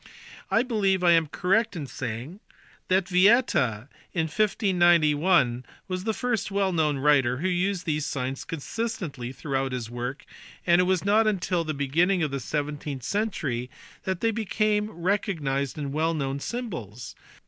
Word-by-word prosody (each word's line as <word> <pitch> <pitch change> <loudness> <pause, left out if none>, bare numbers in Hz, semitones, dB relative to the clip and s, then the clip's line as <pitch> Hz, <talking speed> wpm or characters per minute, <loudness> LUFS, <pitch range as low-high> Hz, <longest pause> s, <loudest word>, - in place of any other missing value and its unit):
I 225 - +3
believe 200 -7 +1
I 175 - +6
am 165 -2 +4
correct 200 +7 +1
in 155 -4 -4
saying 130 - -6 0.5
that 185 0 +2
Vieta 180 - +3 0.3
in 170 - +1
1591 170 - +3 0.2
was 185 0 -4
the 220 - +1
first 225 -3 -1
well 195 -1 0
known 155 -3 +1
writer 135 -3 +3
who 175 +7 -1
used 185 0 0
these 150 -2 -1
signs 130 0 -3
consist 225 +9 -4
ently 135 -8 -5
throughout 135 -3 -2
his 120 -3 -4
work, 125 +3 -5 0.4
and 175 +1 +5
it - - +2
was 185 0 +1
not 215 +2 +4
until 180 -4 0
the 155 -2 -3
beginning 165 +7 +2
of 150 - -1
the 140 - -2
seventeenth 145 0 -4
century 150 - -2 0.3
that 190 -2 -2
they 230 - +2
became 215 -1 0
recognized 165 - -1
and 140 -2 -4
well 160 +2 +1
known 140 -2 -2
symbols. 125 - -6
165 Hz, 155 wpm, -26 LUFS, 140-195 Hz, 0.5 s, I